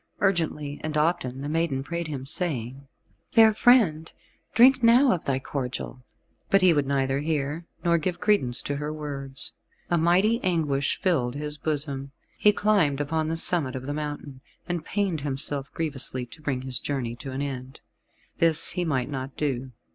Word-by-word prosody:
Urgently 160 -6 -1
and 155 -1 -2
often 150 -5 0
the 145 - -4
maiden 155 -4 0
prayed 170 +2 -4
him, 135 -4 -5
saying, 135 - -3 0.4
"Fair 225 -2 +6
friend, 210 -10 +4 0.4
drink 255 +3 +6
now 245 +3 +6
of 175 - -1
thy 135 -1 +1
cordial." 130 -2 -5 0.5
But 195 -1 +4
he 180 -2 +7
would 145 -3 +1
neither 135 -1 +1
hear, 150 +2 -2 0.2
nor 170 0 +4
give 175 +2 -2
credence 135 - +2
to 145 - -2
her 150 +1 -3
words. 140 -3 -5 0.4
A 175 - +3
mighty 190 +8 +3
anguish 150 -7 0
filled 130 -9 +1
his 150 0 -4
bosom. 140 -2 -2 0.2
He 210 - +5
climbed 200 -10 +2
upon 155 +2 -1
the 165 +1 -2
summit 160 -6 0
of 130 0 -5
the 145 - -3
mountain, 145 -3 -5 0.3
and 175 -2 -2
pained 195 -7 -1
himself 140 0 -2
grievously 135 -5 -1
to 140 +6 -14
bring 135 -4 -2
his 130 -2 -2
journey 125 -5 -3
to 135 +2 -7
an 135 +2 -3
end. 130 -2 -6 0.6
This 165 -1 +3
he 180 - -1
might 130 -7 0
not 135 -1 -6
do. 130 -3 -2
150 Hz, 170 wpm, -26 LUFS, 135-170 Hz, 0.6 s, he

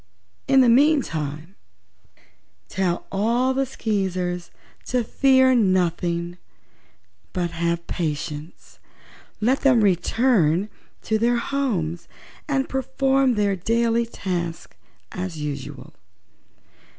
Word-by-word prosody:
In 270 -1 +5
the 250 - +5
meantime 190 - +1 1.2
tell 180 -2 -1
all 235 +6 +1
the 270 0 0
Skeezers 185 -6 -2 0.4
to 250 -1 0
fear 260 +2 +4
nothing, 175 -4 0 0.9
but 175 -2 -1
have 170 0 -2
patience. 155 -1 -5 0.6
Let 250 +6 +2
them 255 -5 +4
return 195 - +2 0.3
to 220 -1 0
their 240 +2 +2
homes 205 - -2 0.4
and 270 -2 0
perform 265 0 +1
their 205 -2 +1
daily 230 +4 +1
tasks 175 -6 -4 0.4
as 180 -2 -5
usual. 145 -3 -6
200 Hz, 90 wpm, -23 LUFS, 170-250 Hz, 1.2 s, In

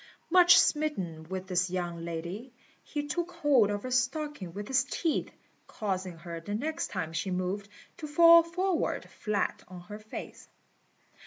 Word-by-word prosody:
Much 355 0 +8
smitten 185 - 0
with 190 0 -4
this 180 -1 0
young 175 -2 -3
lady, 170 +9 -5 0.3
he 295 -1 -4
took 345 +4 -2
hold 285 -10 +4
of 205 0 -3
her 255 - -5
stocking 255 - -1
with 205 +4 -6
his 265 -1 +3
teeth, 315 +3 -1 0.4
causing 185 -5 -3
her, 170 0 -7
the 205 +5 -4
next 310 +8 -2
time 160 0 -4
she 165 +4 -2
moved, 185 +2 -2 0.3
to 310 - -6
fall 335 +3 +8
forward 350 +1 -1
flat 210 -2 -2
on 180 -1 -10
her 210 +4 -9
face. 215 0 -9
210 Hz, 155 wpm, -29 LUFS, 180-300 Hz, 0.4 s, Much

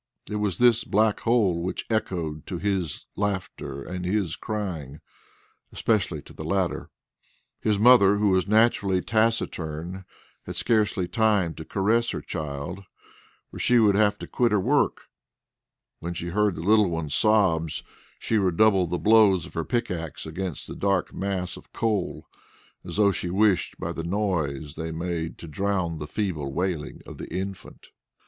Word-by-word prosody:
It 105 - -3
was 105 -4 -1
this 120 -2 +4
black 110 0 +2
hole 105 -8 +2
which 90 - -3
echoed 85 -9 -2
to 90 - -3
his 95 -5 -2
laughter 95 -8 -3
and 90 +3 -5
his 95 -2 0
crying, 85 -10 -5 0.7
especially 95 -9 0
to - - -14
the - - -8
latter. 90 +2 -1 0.7
His 105 -2 +1
mother, 105 -3 +6
who 105 0 +2
was 95 -1 +2
naturally 100 -4 +3
taciturn, 95 -6 -1 0.4
had - - -5
scarcely 105 -5 +1
time 105 -6 +2
to 80 - -8
caress 115 +6 +1
her - - -3
child, 75 +2 -5 0.7
for - - -9
she 125 - +4
would 105 -3 +5
have 105 0 +4
had 105 - -32
to - - -4
quit 120 -1 +1
her 105 - +3
work; 135 +9 +2 1.0
when 85 +1 -5
she 85 0 -4
heard 105 +1 +1
the 80 - -5
little 105 +2 +4
one's 80 -4 -3
sobs, 95 -8 +2 0.3
she 110 - 0
redoubled 95 -1 +3
the 90 - -1
blows 105 -4 +5
of - - -12
her 80 - -2
pickaxe 90 -8 -3
against 85 0 -5
the - - -8
dark 100 -2 0
mass 95 -2 -3
of - - -16
coal, 105 -5 -1 0.6
as - - -7
though 100 -2 +5
she 90 -1 -3
wished 95 0 +2
by - - -3
the - - -4
noise 80 -7 -1
they 80 0 -5
made 85 0 -3
to 85 - -9
drown 90 -1 -1
the 75 - -5
feeble 80 -9 -2
wailing 85 -2 -3
of - - -10
the - - -8
infant. 95 +2 -6
95 Hz, 160 wpm, -25 LUFS, 85-105 Hz, 1.0 s, mother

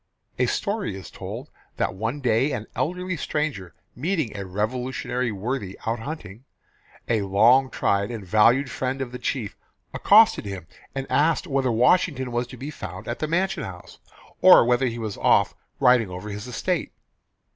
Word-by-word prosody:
A - - +3
story 200 - -2
is 95 - -9
told - - -8 0.3
that - - 0
one 115 +9 -3
day 125 +3 +2
an 110 -4 -4
elderly 180 +2 -2
stranger 140 - -3 0.2
meeting 155 - -1
a 100 -2 -5
Revolutionary 125 +4 -2
worthy 105 -1 -4
out 115 +1 -1
hunting, 115 -5 -7 0.6
a 115 -3 +1
long 115 +7 +4
tried 100 -4 0
and 115 -5 -6
valued 115 +7 +4
friend 130 +1 -2
of 130 -3 -4
the 125 - -7
chief, 115 -7 -3 0.4
accosted 215 - +5
him, 95 -4 -6 0.3
and 135 0 -3
asked 160 +5 +2
whether 135 -5 0
Washington 130 +2 +2
was 120 +1 -1
to 125 - -11
be 140 +5 -6
found 95 - -8
at 120 - -4
the 155 - -1
mansion 185 +1 0
house, 90 -2 -10 0.4
or - - +8
whether 125 +2 +2
he 115 -1 -3
was 110 -3 -4
off - - +3 0.3
riding 125 -5 +4
over 90 +4 -7
his 105 +3 -6
estate. 125 - -2
125 Hz, 165 wpm, -24 LUFS, 105-140 Hz, 0.6 s, or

